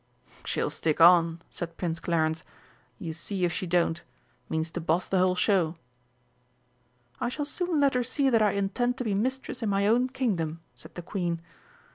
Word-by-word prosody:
"She'll - - -1
stick 155 -1 -1
on," 170 -1 +6
said 170 -1 -6
Prince 165 -2 -2
Clarence, 160 -2 0 0.5
"you 160 +4 -5
see 180 +3 -1
if 170 - -1
she 185 - -3
don't. 170 -1 +1 0.5
Means 160 0 -2
to 175 - -4
boss 165 +2 0
the 190 - +1
whole 185 0 +3
show." 180 -4 +2 1.4
"I 240 - -1
shall 290 +4 -3
soon 350 +1 -1
let 280 -1 +4
her 250 - +2
see 265 +3 +1
that 230 -4 +4
I 210 -2 +3
intend 240 +6 0
to 255 - -2
be 215 -4 -1
mistress 255 +8 -2
in 220 - 0
my 200 0 +1
own 240 +4 +3
Kingdom," 170 -12 -2
said - - -15
the 175 - -6
Queen. 175 -2 -2
185 Hz, 180 wpm, -28 LUFS, 165-240 Hz, 1.4 s, on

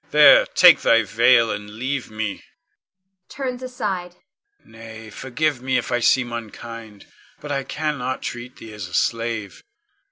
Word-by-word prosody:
There, - - +7
take 180 -2 +8
thy 115 0 +4
veil, 115 +2 +3
and 105 0 -7
leave 130 +3 -3
me 110 -2 -4 0.9
[turns 255 -2 -5
aside]. 205 -9 -4 0.5
Nay, 110 -1 -12
forgive 130 +3 -2
me 130 0 0
if - - -3
I 120 - +1
seem 120 0 +2
unkind, 115 -2 -9 0.3
but 150 - -8
I 140 -1 -1
cannot 145 -4 -3
treat 120 +1 -7
thee 110 - -12
as 105 -3 -7
a 90 - -7
slave. 115 -3 -2
120 Hz, 140 wpm, -21 LUFS, 110-150 Hz, 0.9 s, take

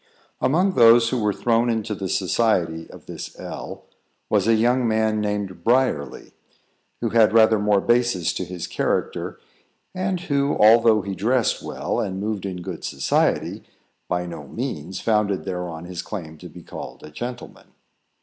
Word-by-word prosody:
Among 180 +9 +2
those 115 -4 +6
who 125 - -1
were 105 -1 +2
thrown 115 +3 +1
into 110 -1 -1
the 95 -2 -4
society 90 -5 0
of - - -13
this - - -8
L, - - -8 0.5
was - - +2
a 115 - +5
young 120 +2 +2
man, 110 -1 +1
named 100 -4 -3
Briarly, 120 - 0 0.7
who - - 0
had 110 -2 +4
rather 110 -1 +6
more 105 -1 +3
basis 120 -7 +1
to - - -3
his 90 -1 -6
character, 90 - -2 0.5
and 185 -1 -2
who, 140 -3 0
although 110 -1 +6
he 100 0 -4
dressed 115 +5 +1
well, - - -3
and 95 0 -2
moved 105 -1 -3
in 90 -2 -6
good - - -7
society, 70 0 0 0.4
by 90 0 -1
no 80 -5 -8
means 80 +7 -5
founded 105 -4 0
thereon 90 -2 -5
his 90 -1 -5
claim 80 -7 -7
to - - -10
be - - -13
called - - -9
a 75 - -10
gentleman. 120 +9 -7
105 Hz, 160 wpm, -23 LUFS, 90-120 Hz, 0.7 s, those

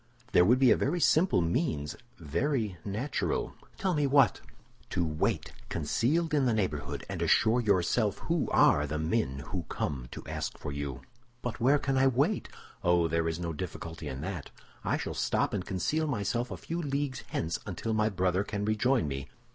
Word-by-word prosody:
"There 90 - +6
would 120 +7 +5
be 130 -2 +5
a - - +7
very 165 +6 0
simple 160 - +4
means, 85 - -1 0.2
very 105 - -1
natural—" 110 +8 -2 0.2
"Tell 190 -2 0
me 150 -3 +2
what!" 135 -6 +4 0.5
"To 85 - 0
wait, 75 -1 -1 0.2
concealed 145 - 0
in 140 -3 +3
the 115 - +2
neighborhood, 90 -9 -2
and - - -4
assure 115 +3 +4
yourself 100 0 +2
who 165 +6 -1
are 75 +1 +4
the 75 +1 -2
men 80 - -1
who 90 - -1
come 65 -5 -3
to - - -8
ask - - -4
for 75 - -5
you." 70 -2 -4 0.4
"But 125 -1 -3
where 135 +5 +5
can 135 -2 0
I 135 - +5
wait?" 140 - +1 0.3
"Oh, 85 -1 +4
there 80 0 0
is 80 +1 -3
no 85 -1 -3
difficulty 80 -1 -6
in 65 -1 -5
that. 85 -3 -5 0.3
I - - +1
shall - - -4
stop - - 0
and 95 - -1
conceal 155 - -1
myself 120 -1 -1
a - - -5
few 170 +1 -4
leagues 140 -2 -2
hence 80 +1 -2
until 100 +4 -3
my 110 0 +2
brother 95 -1 +1
can 105 0 -3
rejoin 120 - +2
me. 70 -1 -4
105 Hz, 180 wpm, -30 LUFS, 80-135 Hz, 0.5 s, a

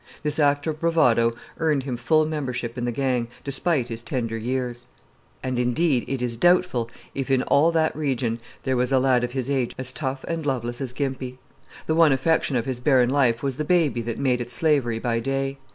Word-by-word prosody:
This 150 +1 -1
act 145 -1 +3
of 155 -2 -2
bravado 125 -9 +3 0.2
earned 150 -4 +1
him 130 -2 -3
full 155 +6 +2
membership 130 -6 -3
in 120 -1 -3
the 120 - 0
gang, 125 -1 0 0.2
despite 140 -2 0
his 115 0 -5
tender 120 -2 -3
years; 120 +1 -3 0.6
and, 130 -1 -1
indeed, 125 +2 +1
it 135 -2 -2
is 120 -1 -2
doubtful 175 -7 +3 0.2
if 135 0 -3
in 130 -1 +3
all 155 +4 +4
that 160 -1 +1
region 130 -6 -1 0.2
there 130 -1 0
was 125 +1 +1
a 135 - +4
lad 130 -1 +3
of 120 0 -3
his 130 -2 -2
age 130 -4 -1
as 130 0 -3
tough 135 -2 -4
and 165 -1 -2
loveless 120 -3 -2
as 130 -3 -2
Gimpy. 130 -1 -4 0.5
The 160 - 0
one 160 -2 +5
affection 135 +1 +1
of 115 -2 0
his 130 -2 -3
barren 125 -2 +3
life 125 -4 +2
was 135 -2 -2
the 150 - -1
baby 155 -7 +2
that 115 0 -4
made 125 -3 +1
it 120 - -5
slavery 135 -5 +1
by 115 0 -1
day. 135 +2 -2
130 Hz, 205 wpm, -24 LUFS, 120-145 Hz, 0.6 s, one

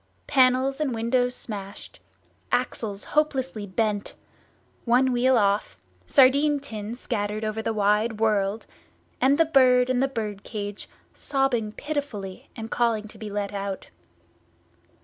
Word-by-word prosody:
Panels 265 +1 +3
and 270 -6 0
windows 245 +2 +1
smashed, 200 -4 -8 0.5
axles 220 -5 -1
hopelessly 265 -8 -1
bent, 205 +1 -1 0.7
one 255 +2 +3
wheel 250 +1 +3
off, 200 - +1 0.3
sardine 280 +2 +5
tins 225 -3 -7
scattered 210 -2 -2
over 215 +1 -2
the 225 - -1
wide 210 +1 +1
world, 210 -1 +1 0.6
and 270 +3 +4
the 330 - +5
bird 255 -4 +4
in 250 - +1
the 270 - +3
bird 215 -6 -5
cage 205 -2 -6 0.2
sobbing 270 -6 0
pitifully 235 -9 -5
and 225 -1 -7
calling 230 -3 +1
to - - -15
be 215 - -6
let 205 0 -3
out. 195 -1 -5
230 Hz, 130 wpm, -25 LUFS, 210-260 Hz, 0.7 s, sardine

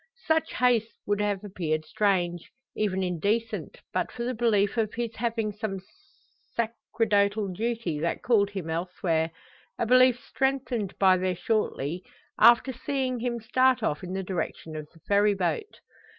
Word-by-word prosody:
Such 320 0 +1
haste 235 -3 +2
would 205 0 0
have 205 -1 -1
appeared 160 -6 -2
strange 175 -2 0 0.3
even 190 -3 0
indecent 205 +6 -1 0.2
but - - -1
for 235 - -5
the 250 +1 -1
belief 220 -3 +2
of 220 -3 -1
his 235 -1 -3
having 225 -2 -1
some 210 -2 -4 0.8
sacerdotal 215 -3 0
duty 215 -5 -2
that 170 +2 -2
called 210 -5 +3
him 190 -5 -5
elsewhere; 165 -1 -1 0.5
a - - 0
belief 255 +1 +5
strengthened 255 -8 -1
by 190 -1 +5
their 185 0 0
shortly 180 -5 -1 0.4
after 240 +4 +6
seeing 255 0 -2
him 235 0 -2
start 255 +2 +2
off 150 -7 -1
in 180 0 -5
the 190 0 -2
direction 170 -3 -4
of 155 -1 -6
the 165 - -21
Ferry 205 +2 +3
boat. 195 - -2
210 Hz, 150 wpm, -27 LUFS, 185-235 Hz, 0.8 s, after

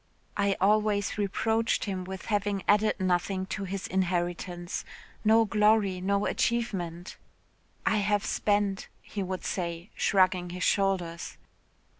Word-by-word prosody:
I 200 -1 +1
always 210 +1 +2
reproached 220 +3 +1
him 190 -3 -3
with 190 0 -7
having 205 -2 0
added 210 0 +3
nothing 185 +1 0
to 200 - -3
his 195 0 -4
inheritance 175 -1 -2 0.4
no 225 +1 +5
glory 210 -3 +3
no 200 +2 +1
achievement 190 -7 -1 0.7
'I 220 -2 +3
have 205 0 +1
spent,' 205 -2 0 0.2
he 205 - -5
would 185 -1 -4
say, 170 +1 -3
shrugging 185 -2 +2
his 180 +1 -4
shoulders. 185 -4 0
195 Hz, 120 wpm, -28 LUFS, 180-210 Hz, 0.7 s, no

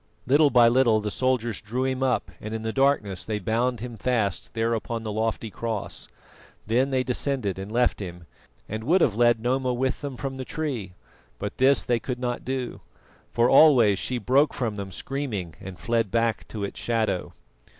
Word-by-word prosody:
Little 145 +4 +5
by 120 -3 +6
little 120 -2 +4
the 105 0 -3
soldiers 125 -3 0
drew 120 +4 -2
him 130 0 -1
up 130 -2 0
and 110 +1 -5
in 110 - -5
the 110 0 -2
darkness 135 -9 +1
they 110 -1 -2
bound 115 +4 0
him 120 -2 -6
fast 105 -5 -1
there 115 +1 +1
upon 115 0 -3
the 110 - -3
lofty 110 +1 -2
cross. 115 -2 -4 0.6
Then 125 +5 +2
they 130 -1 +1
descended 125 -6 -1
and 95 +2 -6
left 120 +2 +2
him, 90 -3 -7 0.4
and 110 +1 -5
would 175 +6 +4
have 120 - +3
led 120 +1 +3
Noma 125 +2 0
with 130 +1 -1
them 140 -3 -5
from 135 0 -4
the 130 - -4
tree. 130 - -4 0.4
But 100 - -6
this 135 +1 +4
they 120 -1 +1
could 125 +2 -4
not 125 -1 -3
do, 130 -1 -4 0.5
for 120 0 +3
always 125 -9 +6
she 125 - -2
broke 130 +6 +2
from 120 -4 -1
them 100 -2 -6
screaming, 105 - -4
and 95 -2 -8
fled 115 +5 0
back 115 0 0
to 105 -2 -5
its 100 - -5
shadow. 110 -6 -1
120 Hz, 190 wpm, -25 LUFS, 110-130 Hz, 0.6 s, by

